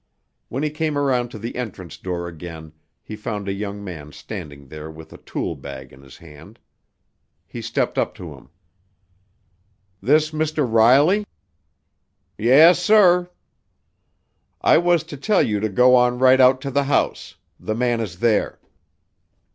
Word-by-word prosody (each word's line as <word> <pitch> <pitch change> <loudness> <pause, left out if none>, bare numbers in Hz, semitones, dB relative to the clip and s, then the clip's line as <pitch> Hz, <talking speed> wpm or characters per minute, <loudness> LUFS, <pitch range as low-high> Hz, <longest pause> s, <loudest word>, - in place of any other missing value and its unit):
When 135 +5 -4
he 150 - -1
came 155 -1 -2
around 130 -4 0
to 115 - -10
the 115 +3 -7
entrance 95 -8 -7
door 85 -2 -5
again 80 -2 -10 0.3
he 110 - -8
found 105 -2 -6
a 95 - -1
young 100 0 -6
man 80 -6 -9
standing 70 -1 -9
there 75 +2 -9
with 80 0 -13
a - - -13
tool 85 - -5
bag 65 -2 -10
in 65 - -16
his 65 -1 -15
hand. 85 +5 -15 0.9
He - - -9
stepped - - -2
up - - -2
to 85 -4 -9
him. 70 -1 -17 1.5
"This 150 +7 +2
Mr. 155 -2 -1
Riley?" 135 - +4 1.1
"Yes, 140 - +5
sir." 180 -5 +4 1.3
"I - - +4
was 175 -1 +2
to 145 - -10
tell 205 +8 +2
you 105 -1 -1
to 110 +1 -2
go 125 +6 +4
on 125 0 +3
right 130 +1 +5
out 130 +1 +5
to 140 -1 -5
the 140 +1 0
house. 140 - -1 0.2
The 110 - -4
man 120 0 0
is 95 -6 -6
there." 115 -3 +1
115 Hz, 155 wpm, -21 LUFS, 85-140 Hz, 1.5 s, Yes